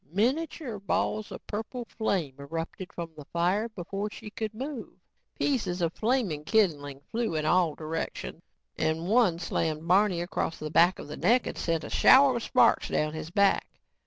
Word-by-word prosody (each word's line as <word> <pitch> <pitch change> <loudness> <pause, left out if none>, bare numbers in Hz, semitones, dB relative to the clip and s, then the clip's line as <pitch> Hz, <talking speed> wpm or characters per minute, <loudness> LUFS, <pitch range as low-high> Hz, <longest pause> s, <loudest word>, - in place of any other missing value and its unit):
Miniature 255 - -1
balls 210 +2 -1
of - - -9
purple 225 +3 -5
flame 195 - -2
erupted 165 +5 -6
from 170 -1 -6
the 150 - -10
fire 185 +8 0
before 200 0 -4
she 210 0 -10
could 220 -1 -4
move. 260 +3 -6 0.4
Pieces 215 -10 0
of 170 -1 0
flaming 220 - 0
kindling 150 -9 +1
flew 225 -6 -1
in 155 -1 -1
all 170 -2 +3
directions 160 +1 -5 0.4
and 160 +2 0
one 215 -5 +4
slammed 160 -2 -2
Barney 190 0 +4
across 175 -2 -2
the 155 -1 -6
back 175 +3 +5
of - - -8
the 150 - -7
neck 235 +8 +3
and - - -4
sent 165 -2 -1
a - - -6
shower 265 -2 +6
of - - -4
sparks - - +3
down 150 0 0
his 155 0 -6
back. 200 +2 +3
185 Hz, 170 wpm, -28 LUFS, 165-220 Hz, 0.4 s, shower